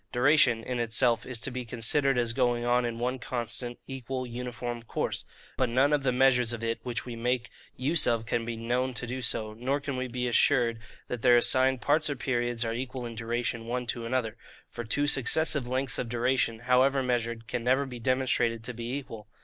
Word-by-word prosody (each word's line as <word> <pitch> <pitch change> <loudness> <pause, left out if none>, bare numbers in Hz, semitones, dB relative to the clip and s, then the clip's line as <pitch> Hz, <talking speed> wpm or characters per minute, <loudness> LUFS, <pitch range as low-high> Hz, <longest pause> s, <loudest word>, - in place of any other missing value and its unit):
Duration, 125 -3 +4
in 125 0 -3
itself, 120 +1 +1
is 125 -2 0
to 135 - 0
be 125 0 -4
considered 125 +3 +1
as 120 -2 +1
going 120 -1 +1
on 120 0 +2
in 115 -1 -3
one 125 +2 -2
constant, 120 0 -4
equal, 130 -1 -5
uniform 120 0 -5
course: 115 - -3 0.3
but 130 -2 +1
none 135 +5 +3
of 145 - +2
the 135 -1 +1
measures 125 -2 +3
of 115 -1 -6
it 115 0 -1
which 120 -3 -4
we 120 -2 -6
make 125 +1 -1 0.2
use 150 +5 +2
of 115 -1 +1
can 115 0 -1
be 115 0 -4
KNOWN 125 +3 -1
to 125 - -2
do 125 +2 -4
so, 110 -3 0
nor 130 +6 -1
can 140 -2 -4
we 130 0 -2
be 125 0 -3
assured 120 -1 +3 0.3
that 125 -2 -4
their 120 0 +6
assigned 130 +1 +4
parts 150 +5 +2
or 145 - -1
periods 120 -2 -1
are 115 - -1
equal 125 +1 -4
in 115 - -6
duration 115 0 -3
one 125 +1 -2
to 120 0 -3
another; 115 -2 -1 0.3
for 120 - -5
two 145 +6 0
successive 145 0 +2
lengths 130 +1 -1
of 120 - -3
duration, 120 -1 0
however 130 +2 +3
measured, 115 -2 -1
can 120 - -3
never 130 +3 +2
be 125 -2 -8
demonstrated 120 -2 0
to 125 +2 -4
be 120 +1 -5
equal. 115 -6 -9
125 Hz, 205 wpm, -28 LUFS, 115-130 Hz, 0.3 s, their